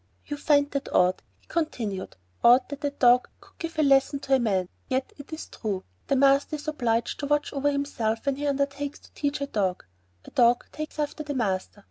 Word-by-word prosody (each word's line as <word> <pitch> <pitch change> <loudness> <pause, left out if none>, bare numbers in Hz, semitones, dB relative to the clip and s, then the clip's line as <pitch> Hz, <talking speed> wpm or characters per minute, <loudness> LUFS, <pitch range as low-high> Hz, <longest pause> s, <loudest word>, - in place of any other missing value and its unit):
"You 290 - -4
find 285 0 +3
that 280 -1 -3
odd," 180 +1 +3 0.2
he - - -30
continued; 230 - -3 0.3
"odd 245 +2 +6
that 285 +1 -7
a 285 - +2
dog 250 -3 +4
could - - -22
give 330 -1 -5
a 310 - +3
lesson 275 0 +4
to 270 - 0
a 265 - +6
man, 195 -6 +1 0.2
yet 260 0 -1
it 285 - -11
is 315 - -5
true. 200 -4 -4 0.2
The 275 - +2
master 275 +2 +4
is 300 +1 -8
obliged 235 -6 0
to 285 - -2
watch 295 0 +1
over 285 0 +1
himself 250 -6 -1
when 275 -1 0
he 290 +1 -2
undertakes 280 0 -1
to - - -20
teach 285 -1 -2
a - - +1
dog. 195 - -1 0.4
The - - -13
dog 240 -1 +4
takes 305 0 -6
after 300 +1 -2
the 290 -2 -4
master. 200 -4 -1
275 Hz, 210 wpm, -26 LUFS, 235-290 Hz, 0.4 s, odd